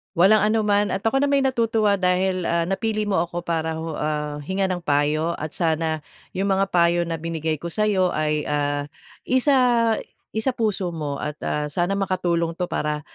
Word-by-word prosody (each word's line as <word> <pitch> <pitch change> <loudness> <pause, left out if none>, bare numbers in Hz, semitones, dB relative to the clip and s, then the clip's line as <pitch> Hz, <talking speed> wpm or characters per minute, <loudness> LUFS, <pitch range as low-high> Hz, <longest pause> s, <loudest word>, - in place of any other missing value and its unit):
Walang 195 +4 +5
anuman 210 -1 +2
at 195 - -3
ako 230 +4 +2
nama'y 280 -1 +2
natutuwa 225 -5 +2
dahil, 185 0 +1
ah, 170 0 +1
napili 215 +4 -1
mo 205 -4 +1
ako 175 +1 -2
para 160 -2 -1
hu 160 0 -4
ah, 150 -1 -2
hingan 190 +5 -1
ng 180 -1 -3
payo 150 +3 +1
at 155 0 -5
sana 160 -2 0 0.3
yung 195 +2 -1
mga 195 0 +1
payo 170 0 +3
na 165 -1 -4
binigay 160 -1 -2
ko 170 - -5
sayo 190 -1 +1
ay, 150 -1 0
ah, 145 -1 -1 0.4
isa 250 -4 +3 0.4
isapuso 220 -7 0
mo 150 -3 -3
at, 150 -1 -4
ah, 150 0 -1
sana 175 +6 -1
makatulong 175 -4 0
'to 180 0 -3
para 150 0 -2
175 Hz, 170 wpm, -23 LUFS, 160-205 Hz, 0.4 s, Walang